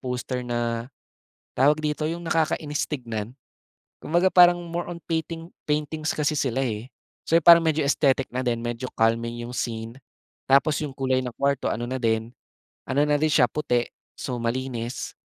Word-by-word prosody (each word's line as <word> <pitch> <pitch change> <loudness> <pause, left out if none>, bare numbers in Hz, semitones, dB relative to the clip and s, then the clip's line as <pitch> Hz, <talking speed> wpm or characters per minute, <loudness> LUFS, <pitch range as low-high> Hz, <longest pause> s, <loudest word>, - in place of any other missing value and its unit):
poster 125 0 -3
na 120 -1 -2 0.7
tawag 145 +3 +5
dito, 150 0 -1
'yong 170 +1 -5
nakakainis 155 -2 0
tignan. 115 -6 -4 0.7
Kumbaga 175 +3 +2
parang 175 0 +7
more 170 +1 -4
on 175 - -5
painting 165 +1 -3 0.2
paintings 155 +1 -1
kasi 150 0 +1
sila, 135 -2 0
eh. 115 0 -4 0.4
So, 165 - +4
parang 170 0 +9
medyo 155 -2 +1
aesthetic 135 -2 +1
na 125 - -1
din, 120 -1 0
medyo 120 +2 -3
calming 115 +1 +1
'yong 120 - -8
scene 115 0 -3 0.6
tapos 140 +3 +4
'yong 150 - -3
kulay 130 -1 +1
ng 125 - -4
kwarto 140 -1 +1
ano 120 +2 -2
na 130 - -4
din, 115 +1 0 0.5
ano 140 +3 +2
na 150 -1 +2
din 155 - +2
siya, 125 -6 +4
puti 125 -6 0 0.3
so, 125 -2 -4
malinis. 120 0 -3
130 Hz, 160 wpm, -25 LUFS, 120-155 Hz, 0.7 s, parang